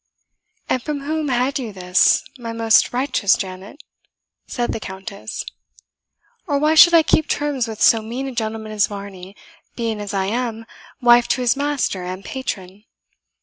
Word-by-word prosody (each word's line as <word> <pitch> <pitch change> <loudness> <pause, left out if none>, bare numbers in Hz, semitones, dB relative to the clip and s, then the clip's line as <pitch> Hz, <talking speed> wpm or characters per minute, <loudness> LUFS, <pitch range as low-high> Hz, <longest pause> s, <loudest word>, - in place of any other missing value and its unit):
"And 255 - 0
from 295 +1 -4
whom 310 +1 -2
had 260 +2 0
you 235 -4 -5
this, 180 -1 +3 0.2
my 230 -1 -6
most 225 -1 +3
righteous 245 -5 +2
Janet?" 190 +9 -8 0.6
said 240 -1 -2
the - - -4
Countess; 200 +1 -7 1.0
"or 290 -3 +1
why 305 +2 +2
should 340 +2 +8
I 325 - +6
keep 315 - +2
terms 285 -5 -1
with 220 -1 -7
so 225 - +5
mean 240 +5 -5
a - - -4
gentleman 220 -2 -4
as 210 -1 +2
Varney, 200 -2 -9 0.4
being 225 -3 -3
as 205 - -5
I 195 -2 -1
am, 230 +1 -3 0.4
wife 240 0 +5
to 255 - 0
his 245 -2 +2
master 280 -9 -1
and 185 +2 -6
patron?" 205 -6 -6
230 Hz, 160 wpm, -20 LUFS, 200-265 Hz, 1.0 s, should